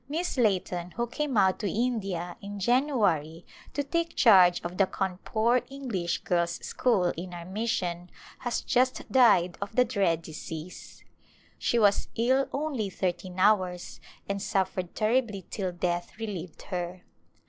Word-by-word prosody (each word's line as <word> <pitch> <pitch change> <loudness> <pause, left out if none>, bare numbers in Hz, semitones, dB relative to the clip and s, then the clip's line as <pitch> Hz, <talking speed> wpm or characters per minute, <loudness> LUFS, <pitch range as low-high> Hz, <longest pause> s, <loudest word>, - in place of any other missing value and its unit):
Miss 335 +4 -2
Layton 185 -7 0
who 235 - +1
came 275 +1 -2
out 190 -2 +4
to 205 - -1
India 195 -7 -2
in 200 0 -7
January 200 - +1 0.3
to 285 - 0
take 335 +3 -2
charge 185 -7 +6
of 175 +1 -5
the 195 - +4
Cawnpore 220 +7 0
English 235 -11 -3
Girls' 170 -1 +1
School 195 -8 +2
in 180 +1 -6
our 170 -1 -7
mission 180 -3 -2 0.3
has 245 -1 -2
just 255 +1 0
died 205 -9 +4
of 200 +2 -5
the 250 - +5
dread 195 -8 +1
disease. 160 +2 -8 0.6
She 240 - +1
was 205 -3 +3
ill 260 +4 +2
only 275 -8 -2
thirteen 180 0 -3
hours 185 -3 +1 0.3
and 200 0 -2
suffered 185 -2 -1
terribly 215 -4 0
till 190 -4 -2
death 175 +1 -3
relieved 190 -7 -6
her. 180 -1 -4
195 Hz, 140 wpm, -28 LUFS, 180-240 Hz, 0.6 s, charge